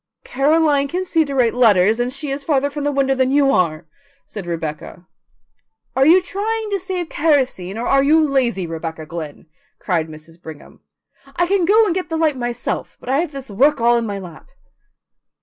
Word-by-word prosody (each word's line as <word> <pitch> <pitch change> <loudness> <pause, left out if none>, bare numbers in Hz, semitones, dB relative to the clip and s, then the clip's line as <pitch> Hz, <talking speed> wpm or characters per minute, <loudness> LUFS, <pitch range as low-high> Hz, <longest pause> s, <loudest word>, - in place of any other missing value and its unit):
"Caroline 285 +1 +2
can 360 +6 -3
see 330 -3 +2
to 280 -1 -5
write 245 -3 +2
letters, 220 -3 +4
and 245 +1 -1
she 275 +1 -5
is 275 +1 -4
farther 285 -1 0
from 290 0 -5
the 290 - +1
window 270 -1 +1
than 260 -1 +1
you 275 0 +3
are," 170 - 0 0.4
said 200 -5 -8
Rebecca. 165 +1 -6 0.9
"Are 270 +1 +3
you 360 +3 +6
trying 430 +3 -3
to 400 - 0
save 365 -2 -4
kerosene 260 - 0
or 235 - -3
are 275 +2 +3
you 300 +4 +4
lazy, 245 -9 0
Rebecca 165 -1 -6
Glynn?" 155 -2 -8 0.3
cried 170 -5 -1
Mrs. 160 +2 -14
Brigham. 160 -3 -12 0.5
"I 350 - +2
can 380 -1 +1
go 435 +5 +5
and 345 - 0
get 370 0 -3
the 325 - -2
light 315 -3 +1
myself, 240 -1 -4
but - - -10
I 270 +2 +2
have 335 -2 -2
this 275 -4 -8
work 270 +9 +3
all 235 +1 +3
in 235 -1 -1
my 200 -1 -4
lap." 175 -5 -11
270 Hz, 195 wpm, -19 LUFS, 190-310 Hz, 0.9 s, you